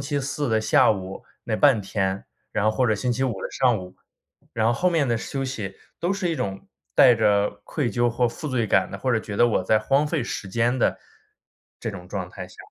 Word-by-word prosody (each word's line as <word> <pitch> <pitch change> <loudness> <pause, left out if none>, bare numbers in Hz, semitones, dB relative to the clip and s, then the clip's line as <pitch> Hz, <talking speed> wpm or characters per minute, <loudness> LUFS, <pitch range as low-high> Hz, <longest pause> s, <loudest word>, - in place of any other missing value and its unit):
期 140 +1 -2
四 140 +1 -2
的 110 -1 +2
下 110 - +4
午 95 -1 -7 0.2
那 110 -2 -1
半 135 -6 +5
天， 95 -1 -2 0.3
然 105 - 0
后 110 - +4
或 125 +3 +1
者 110 - +2
星 120 +4 -1
期 130 - -2
五 125 - 0
的 - - -4
上 125 -4 +2
午。 90 0 -10 0.6
然 110 -1 +1
后 115 - +4
后 180 +10 +1
面 160 -6 +1
的 120 - +2
休 135 +3 -4
息 110 -8 -5 0.2
都 175 +3 0
是 195 -2 -1
一 160 - -2
种 95 -1 -4 0.3
带 125 -2 +7
着 105 -2 +2
愧 140 -7 -2
疚 120 0 +1
或 120 +1 +1
负 150 +6 -6
罪 120 -4 0
感 - - +2
的， 100 - -6
或 130 - -1
者 115 - +3
觉 105 - -7
得 120 - +5
我 100 - +1
在 110 +3 +3
荒 135 +7 +2
废 150 -3 -1
时 105 - -5
间 120 +5 +1
的， - - +1 0.8
这 115 - -3
种 90 -3 -9
状 95 -2 -4
态 - - -8
下。 - - -17
115 Hz, 255 characters per minute, -24 LUFS, 105-135 Hz, 0.8 s, 带